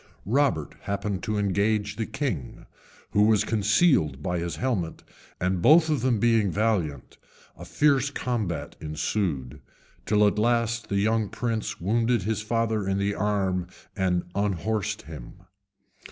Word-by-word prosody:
Robert 105 - +1
happened 100 -1 -3
to 105 -1 -2
engage 100 +1 0
the 110 - -3
king, 135 - -4 0.5
who 105 - +3
was 105 -1 +4
concealed 105 - +2
by 90 -1 -1
his 85 -1 -3
helmet, 105 -11 -2 0.4
and, 90 0 0
both 160 - +6
of 150 - 0
them 125 -3 +2
being 115 -3 +3
valiant, 90 - -1 0.4
a 90 - -10
fierce 140 - +2
combat 115 - -3
ensued, 75 - -2 0.5
till 105 +1 +4
at 105 +1 +2
last 115 0 +1
the 100 - 0
young 110 +1 +1
prince 115 -1 -3
wounded 115 +3 +1
his 110 +2 -1
father 110 -2 -1
in 95 - 0
the 100 +1 0
arm 95 -4 0 0.3
and 90 -3 +1
unhorsed 100 +1 -1
him. 90 +9 -11
105 Hz, 140 wpm, -26 LUFS, 90-115 Hz, 0.5 s, both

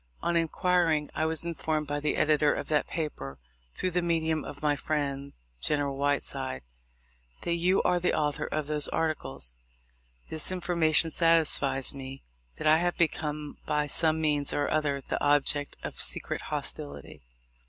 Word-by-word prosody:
On 170 - 0
inquiring, 165 -2 +1
I 160 - 0
was 160 +1 +1
informed 160 -2 -2
by 145 0 -2
the 150 +1 -1
editor 150 -1 +3
of - - -5
that 150 -2 +1
paper, 70 - -5 0.4
through 185 - -1
the 180 +1 +1
medium 160 -2 0
of 145 +1 -9
my 150 -1 +3
friend, 140 -2 -3 0.3
General 145 - 0
Whiteside, 135 - -1 0.8
that 170 - -1
you 180 +3 +2
are 180 - +2
the 175 - +1
author 150 0 -1
of 155 -1 -2
those 150 0 +1
articles. 155 - -2 0.7
This 160 +3 -2
information 170 -3 +2
satisfies 155 -5 +3
me 135 0 -8 0.3
that - - -6
I 155 +1 +6
have 175 +1 0
become, 150 -3 -1
by 150 0 +1
some 160 +2 +4
means 150 -2 0
or 145 - 0
other, 145 -3 0
the - - -3
object 145 0 +1
of - - -4
secret - - +1
hostility. 70 -1 -4
150 Hz, 155 wpm, -28 LUFS, 145-165 Hz, 0.8 s, I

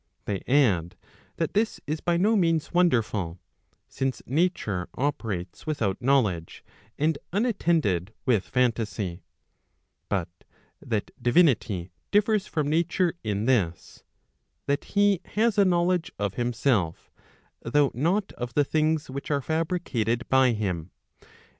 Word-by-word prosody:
They 100 -2 -2
add, 105 - +2 0.4
that 165 - -2
this 215 +2 0
is 155 +2 -3
by 175 -1 +1
no 210 +6 +3
means 165 -5 +1
wonderful, 110 - +1 0.5
since 135 -1 -3
nature 130 - 0
operates 110 - -3
without 110 -9 -1
knowledge, 115 -11 +1 0.3
and 155 0 +1
unattended 165 - +1
with 115 -7 +3
phantasy; 110 -7 -1 0.9
but 95 -4 0 0.5
that - - -3
divinity 120 - +2 0.2
differs 210 0 +2
from 150 -3 -1
nature 170 +3 +1
in 105 -1 -1
this, 95 -10 0 0.6
that 140 +1 -1
he 200 -2 +2
has 220 -1 +2
a 200 - +6
knowledge 175 -1 +1
of 100 -2 -2
himself, 120 -7 0 0.5
though 140 +4 +2
not 175 - 0
of 120 0 -6
tbe 145 - +4
things 155 +1 +1
which 140 +2 -6
are 145 -2 +2
fabricated 155 - -1
by 130 -2 +4
him. 95 -6 -3
135 Hz, 120 wpm, -26 LUFS, 105-170 Hz, 0.9 s, a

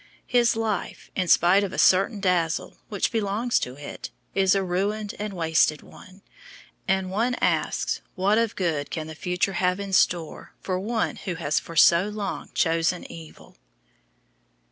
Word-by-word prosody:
His 240 -2 +3
life, 220 -4 -3
in 185 - -1
spite 180 +4 +5
of 195 - -3
a - - -7
certain 195 +3 +4
dazzle 180 -4 0
which 205 -2 -1
belongs 225 +2 0
to 125 - -5
it, 145 +1 -8 0.2
is 190 0 +3
a 195 - +1
ruined 200 +4 -2
and 210 0 -3
wasted 160 -3 +1
one, 185 +2 -16 0.6
and 190 -1 0
one 235 +6 0
asks - - 0
what 200 +4 +2
of 230 -2 0
good 155 -6 -1
can 160 -2 -4
the 160 - -8
future 180 +4 -1
have 180 +1 0
in 200 -1 -5
store 170 -4 0
for 185 -1 -2
one 220 +3 -2
who 185 -3 -5
has 155 -3 0
for 165 - -11
so 170 +4 +6
long 210 -1 -5
chosen 165 +1 +1
evil? 160 -2 -13
185 Hz, 160 wpm, -25 LUFS, 170-205 Hz, 0.6 s, so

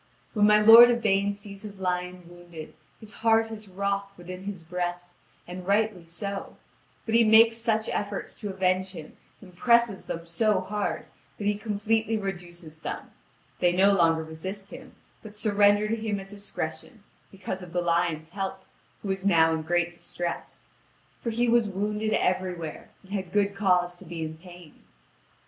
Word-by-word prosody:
When 210 -1 +4
my 210 0 +6
lord 225 +3 +10
Yvain 205 -4 +2
sees 200 -1 -9
his 205 -2 -9
lion 180 -1 -3
wounded, 175 -2 -11 0.3
his 215 -2 -8
heart 225 0 +3
is 215 -1 -8
wroth 200 +1 -2
within 180 +2 -9
his 195 -4 -6
breast, 175 +1 -4 0.3
and 180 +1 -8
rightly 200 -3 +1
so; 200 +4 -5 0.5
but 225 - -3
he 230 0 +6
makes 225 +1 +6
such 225 -1 0
efforts 205 -1 -3
to 205 - -5
avenge 190 0 0
him, 160 -4 -10 0.3
and 185 -4 -15
presses 235 -1 +3
them 165 0 -5
so 190 +4 +2
hard, 205 +2 -3 0.3
that 205 - -5
he 205 - +3
completely 220 +1 0
reduces 175 -5 -6
them; - - -6 0.5
they 175 - +3
no 195 +3 +5
longer 165 -4 +3
resist 190 +5 -7
him, - - -11 0.3
but 215 -1 -11
surrender 205 0 +3
to 225 - 0
him 215 -3 -2
at 195 0 -10
discretion, 200 0 -6 0.3
because 190 -1 -6
of 180 -2 -10
the 180 - 0
lion's 170 -2 0
help, 195 +1 -5 0.4
who 200 - -2
is 190 0 -3
now 165 -4 +4
in 160 - -1
great 175 +1 0
distress; 175 0 -6 0.6
for 235 - -2
he 235 +2 +1
was 235 -2 +3
wounded 210 +2 -2
everywhere, 180 -3 -2
and 190 - -17
had 190 -3 -3
good 200 0 +1
cause 180 -3 +2
to 190 - -14
be 165 -1 -5
in 160 0 -5
pain. 175 -2 -15
195 Hz, 165 wpm, -27 LUFS, 175-210 Hz, 0.6 s, lord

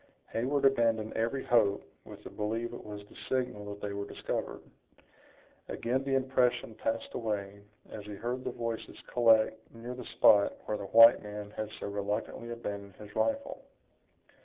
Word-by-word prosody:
Heyward 135 +5 +1
abandoned 115 -5 +3
every 115 +4 -1
hope, 100 -4 +3 0.2
with - - -11
the - - -8
belief 115 +3 -2
it - - -8
was 105 -1 -8
the - - -19
signal 125 -5 -1
that 100 0 -9
they 100 -1 -3
were 100 0 -4
discovered. - - -4 1.1
Again 130 +3 -1
the 135 0 0
impression 130 -3 +1
passed 115 +1 -3
away, 100 -3 -3 0.3
as 105 - -7
he 105 - -6
heard 120 +5 -3
the - - -2
voices 115 -1 -5 0.2
collect 110 -2 +5 0.2
near 120 +2 -6
the 125 0 -7
spot 100 -3 +6
where 105 - -1
the 100 - -5
white 115 +3 +8
man 105 0 -7
had 110 0 -4
so - - -5
reluctantly 105 +3 -3
abandoned 100 -4 -6
his 105 -1 -12
rifle. 280 0 -1
115 Hz, 160 wpm, -31 LUFS, 105-120 Hz, 1.1 s, white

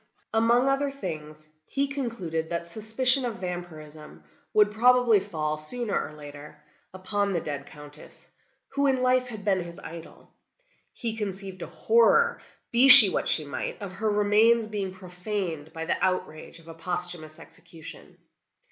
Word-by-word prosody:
"Among 235 +3 +2
other 275 +1 0
things, 155 - -9 0.2
he 275 - -3
concluded 220 - -5
that 170 0 -4
suspicion 225 +8 +2
of 240 -3 -4
vampirism 160 -5 -9 0.3
would 210 -1 +3
probably 240 0 +3
fall, 155 -6 -4
sooner 210 +8 -2
or - - -2
later, 150 0 -12 0.3
upon 200 +2 -3
the 170 - -1
dead 145 -3 -7
Countess, 150 0 -15 0.4
who 280 0 -1
in 260 -2 0
life 255 0 +1
had 215 -4 -10
been 195 -2 +1
his 170 -1 -9
idol. 165 0 -13 0.6
He 230 -2 -6
conceived 195 -3 -6
a - - -6
horror, 230 - +2 0.3
be 245 +3 +4
she 250 -6 +13
what - - -2
she 155 - +2
might, 140 - -6
of 200 -3 -8
her 215 +3 -3
remains 210 +3 +2
being 205 -3 -5
profaned 180 -4 -6
by 160 0 -7
the - - -3
outrage 170 -4 -3
of 165 -1 -19
a 165 - -10
posthumous 175 -1 -6
execution. 160 -2 -15
190 Hz, 150 wpm, -25 LUFS, 160-230 Hz, 0.6 s, she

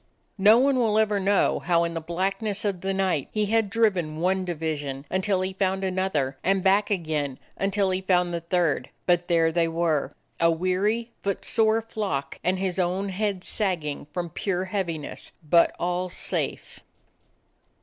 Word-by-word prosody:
No 210 +4 +7
one 265 +1 +3
will 220 -3 +2
ever 210 -2 +2
know 195 0 +2
how 170 -1 +2
in 170 0 -2
the 165 - -3
blackness 195 +5 -2
of 195 -4 -1
the 195 - -1
night 185 -7 0
he 215 -1 0
had 220 0 +1
driven 190 -8 +1
one 185 +2 +1
division 150 -5 -3
until 190 0 +1
he 190 +1 -2
found 190 0 0
another, 185 -8 -1
and 190 0 +2
back 200 +2 +3
again 155 -8 -1 0.2
until 195 0 0
he 185 0 -1
found 180 -2 +2
the 170 - -2
third. 170 -2 0 0.2
But 175 -1 +2
there 165 -2 +3
they 165 0 +2
were, 165 -2 0 0.2
a 165 - +4
weary, 190 +7 0
footsore 220 +3 +1
flock, 205 -11 -3
and 185 +1 +1
his 190 -1 -2
own 185 +2 0
head 195 -1 -2
sag 190 -6 -1
ging 145 -1 -5
from 175 -1 -4
pure 185 +2 -2
heaviness; 175 -6 -4
but 170 +2 +4
all 180 +1 -1
safe! - - -3
185 Hz, 165 wpm, -25 LUFS, 170-200 Hz, 0.2 s, No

